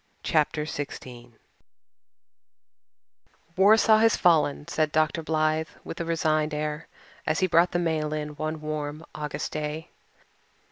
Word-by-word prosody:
CHAPTER 150 -1 +1
XVI 145 -2 -5
REALISM 125 - -9
AND 120 0 -13
ROMANCE 120 -2 -25 2.2
"Warsaw 215 +3 +6
has 225 0 +4
fallen," 155 -4 +2
said 155 -1 0
Dr. 155 +2 +1
Blythe 155 0 0
with 165 - -6
a - - -2
resigned 155 -2 0
air, 150 +1 -3 0.4
as 155 - +1
he - - +4
brought 175 0 +4
the - - -1
mail 160 -3 -1
in 150 -1 -3
one 155 +1 -4
warm 155 +1 -4
August 150 -1 -4
day. 155 +1 -4
155 Hz, 140 wpm, -26 LUFS, 150-165 Hz, 2.2 s, Warsaw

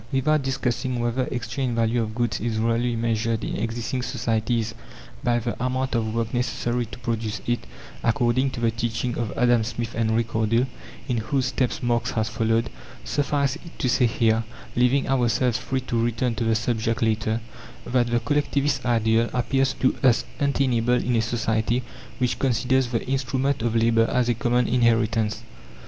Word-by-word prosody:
Without 150 +3 +2
discussing 130 -2 -1
whether 120 +2 0
exchange 125 0 -2
value 115 +1 +2
of 110 -1 -4
goods 120 -2 0
is 115 0 -2
really 115 +2 +1
measured 115 0 0
in - - -3
existing 115 +2 -2
societies 115 -2 -1 0.5
by 120 -2 +2
the 120 0 -2
amount 130 +1 -1
of 110 -2 -1
work 115 +1 -1
necessary 120 -1 -1
to 100 - -9
produce 115 -4 -3
it 120 -1 -1 0.4
according 120 +3 +2
to 125 - -6
the 115 -1 +2
teaching 115 +1 -2
of 115 -3 -2
Adam 120 -1 +4
Smith 115 0 -4
and 110 -1 +1
Ricardo, 115 +1 +1 0.4
in 125 - 0
whose 125 +4 0
footsteps 125 -2 -1
Marx 120 -1 +1
has 110 -1 0
followed 115 +1 0 0.3
suffice 140 -1 0
it 170 0 -14
to - - 0
say 125 0 +3
here, 115 0 +2 0.3
leaving 125 +3 +3
ourselves 125 -2 +2
free 130 0 -2
to 120 -2 -1
return 120 +1 0
to 115 - -2
the 115 0 +2
subject 115 0 0
later, 110 0 +1 0.5
that 120 -1 +1
the 120 0 +1
Collectivist 140 +1 0
ideal 115 -1 +2
appears 135 +2 +1
to 130 - +1
us 120 -3 +4
untenable 130 -4 +2
in 125 0 0
a 115 - +3
society 115 +1 0 0.3
which 125 -1 0
considers 130 0 +2
the 120 -1 -2
instruments 135 0 0
of 115 0 0
labour 115 0 +4
as 125 -1 +1
a - - +4
common 120 +1 +1
inheritance. 115 -2 +2
120 Hz, 165 wpm, -24 LUFS, 115-125 Hz, 0.5 s, Adam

